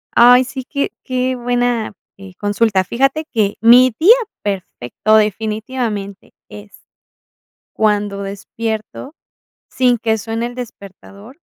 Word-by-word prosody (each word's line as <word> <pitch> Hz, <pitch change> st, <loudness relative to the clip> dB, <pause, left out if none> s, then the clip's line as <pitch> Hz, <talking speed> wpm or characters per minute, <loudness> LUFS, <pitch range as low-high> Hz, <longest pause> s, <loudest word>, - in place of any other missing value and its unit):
Ay, 245 Hz, +2 st, +7 dB
sí, 260 Hz, +1 st, -7 dB
qué 280 Hz, +2 st, -3 dB
qué 255 Hz, 0 st, -1 dB
buena, 245 Hz, -3 st, -1 dB, 0.2 s
eh, 195 Hz, -1 st, -12 dB
consulta. 205 Hz, -1 st, +1 dB
Fíjate 275 Hz, -, 0 dB
que 210 Hz, -4 st, +1 dB
mi 245 Hz, +2 st, +7 dB
día 390 Hz, +9 st, +7 dB, 0.3 s
perfecto 195 Hz, -, -1 dB
definitivamente 215 Hz, -1 st, -2 dB, 0.2 s
es 205 Hz, 0 st, -12 dB, 1.0 s
cuando 205 Hz, -2 st, 0 dB
despierto 220 Hz, +7 st, -6 dB, 0.5 s
sin 250 Hz, -2 st, +2 dB
que 225 Hz, -1 st, 0 dB
suene 225 Hz, +2 st, -3 dB
el 245 Hz, -, -9 dB
despertador, 215 Hz, -, -11 dB
225 Hz, 110 wpm, -17 LUFS, 205-250 Hz, 1.0 s, Ay